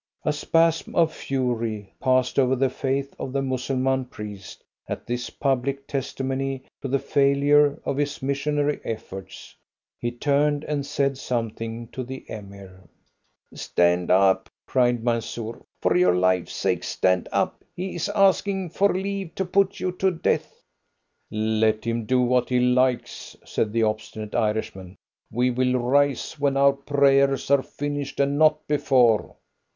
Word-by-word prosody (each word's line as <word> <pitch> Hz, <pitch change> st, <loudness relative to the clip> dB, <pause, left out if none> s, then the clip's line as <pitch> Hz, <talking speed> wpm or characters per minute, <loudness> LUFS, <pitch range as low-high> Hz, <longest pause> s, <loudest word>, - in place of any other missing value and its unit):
A 150 Hz, -, +2 dB
spasm 165 Hz, +2 st, +1 dB
of 165 Hz, -2 st, +3 dB
fury 115 Hz, -6 st, -2 dB
passed 130 Hz, 0 st, +2 dB
over 130 Hz, 0 st, +3 dB
the 130 Hz, 0 st, +1 dB
face 135 Hz, +1 st, -2 dB
of 130 Hz, -, -4 dB
the 140 Hz, 0 st, 0 dB
Mussulman 130 Hz, 0 st, 0 dB
priest 105 Hz, -5 st, -9 dB, 0.3 s
at -, -, -5 dB
this 120 Hz, 0 st, -3 dB
public 135 Hz, 0 st, -1 dB
testimony 135 Hz, 0 st, -3 dB, 0.2 s
to 140 Hz, -, -3 dB
the 135 Hz, +1 st, +1 dB
failure 140 Hz, +1 st, +3 dB
of 135 Hz, -, -1 dB
his 145 Hz, 0 st, -1 dB
missionary 145 Hz, +2 st, 0 dB
efforts. 95 Hz, -4 st, -7 dB, 0.4 s
He 120 Hz, -, -1 dB
turned 145 Hz, +4 st, +1 dB
and 145 Hz, -2 st, -3 dB
said 140 Hz, -2 st, 0 dB
something 115 Hz, -2 st, -3 dB
to 130 Hz, -, -5 dB
the 130 Hz, +2 st, -8 dB
Emir. 100 Hz, -3 st, -10 dB, 0.7 s
"Stand 90 Hz, 0 st, +1 dB
up!" 95 Hz, 0 st, +3 dB, 0.2 s
cried 120 Hz, -2 st, +1 dB
Mansoor. 115 Hz, -1 st, -3 dB, 0.2 s
"For -, -, +3 dB
your 90 Hz, 0 st, +4 dB
life's 90 Hz, -1 st, +1 dB
sake, -, -, 0 dB
stand 90 Hz, -1 st, 0 dB
up! -, -, -1 dB
He 185 Hz, +1 st, -4 dB
is 175 Hz, +3 st, -2 dB
asking 195 Hz, -2 st, +2 dB
for 200 Hz, +3 st, +3 dB
leave 195 Hz, -1 st, -3 dB
to 190 Hz, -, -1 dB
put 195 Hz, +1 st, +1 dB
you 185 Hz, -, -1 dB
to 190 Hz, -, +3 dB
death." 170 Hz, -3 st, -2 dB, 0.7 s
"Let 110 Hz, 0 st, +1 dB
him 115 Hz, -1 st, -1 dB
do 130 Hz, 0 st, +3 dB
what 125 Hz, 0 st, +2 dB
he 125 Hz, -1 st, +2 dB
likes!" 125 Hz, 0 st, 0 dB
said 110 Hz, -, -1 dB
the 115 Hz, +1 st, +1 dB
obstinate 110 Hz, 0 st, -3 dB
Irishman; 105 Hz, -4 st, -2 dB, 0.4 s
"we 125 Hz, +3 st, +1 dB
will 125 Hz, +1 st, +1 dB
rise 140 Hz, +4 st, +1 dB
when 140 Hz, -1 st, +1 dB
our 140 Hz, 0 st, +5 dB
prayers 140 Hz, -1 st, +2 dB
are 140 Hz, -1 st, +5 dB
finished, 145 Hz, 0 st, -5 dB
and 140 Hz, +1 st, +1 dB
not 155 Hz, -1 st, +4 dB
before." 130 Hz, -7 st, +3 dB
130 Hz, 145 wpm, -24 LUFS, 115-145 Hz, 0.7 s, our